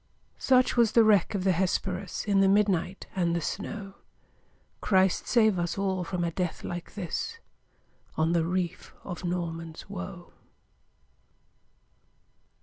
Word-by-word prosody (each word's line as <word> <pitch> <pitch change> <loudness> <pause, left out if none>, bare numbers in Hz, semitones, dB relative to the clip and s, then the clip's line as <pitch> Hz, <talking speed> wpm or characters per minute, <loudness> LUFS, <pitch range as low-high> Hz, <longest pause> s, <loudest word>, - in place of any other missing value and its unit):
Such 255 -1 +3
was 235 -3 +4
the 230 - +7
wreck 215 -1 +3
of 190 - -1
the 190 - +3
Hesperus, 185 +1 -1
In 200 -2 +3
the 195 - +5
midnight 195 -2 +1
and 170 -2 +1
the - - +1
snow! 195 +3 -5 0.9
Christ 190 -2 +2
save 220 -6 +3
us 175 +2 -2
all 190 -2 0
from 175 0 -3
a 170 - -1
death 180 0 -3
like 175 0 -6
this, 210 - -4 0.8
On 160 +1 +2
the 170 -1 +2
reef 175 0 -3
of 180 -2 -6
Norman's 170 0 -4
Woe! 190 -2 -7
185 Hz, 135 wpm, -28 LUFS, 175-200 Hz, 0.9 s, the